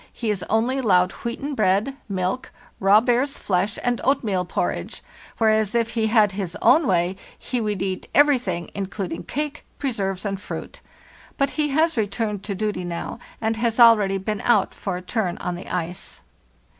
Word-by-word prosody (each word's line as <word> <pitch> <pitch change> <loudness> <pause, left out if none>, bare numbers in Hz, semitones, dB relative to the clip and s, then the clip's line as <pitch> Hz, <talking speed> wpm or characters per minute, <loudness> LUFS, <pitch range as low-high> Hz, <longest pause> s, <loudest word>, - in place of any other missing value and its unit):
He 225 -3 -2
is 200 -3 -2
only 235 +5 +1
allowed 185 -6 +3
wheaten 275 +5 -5
bread, 215 +3 +1
milk, 190 +6 -2 0.3
raw 200 +2 +6
bear's 250 +3 +1
flesh, 195 +2 0
and 245 -1 0
oatmeal 215 -9 +1
porridge; - - -3 0.3
whereas 220 -1 +2
if 230 -1 +1
he 225 -2 +1
had 215 -2 +4
his 190 -1 -4
own 315 -1 +5
way 180 -1 +2 0.2
he 245 -1 -3
would 210 -3 -1
eat 190 -1 -3
everything, 250 - +3
including 195 -1 -4
cake, 300 0 -4
preserves, 200 -8 -2
and 195 -1 -3
fruit. - - -7 0.6
But 275 0 +1
he 300 -1 0
has 310 +1 +2
returned 210 -1 -1
to 200 - -3
duty 210 -2 -2
now, 175 +5 -5 0.2
and 225 0 -1
has 230 0 0
already 210 -5 +6
been 205 +2 -3
out 240 - +3
for 190 -3 -4
a 180 - -8
turn 185 -3 -1
on 180 - -3
the 175 +2 -8
ice. 175 0 -4
215 Hz, 170 wpm, -23 LUFS, 190-240 Hz, 0.6 s, raw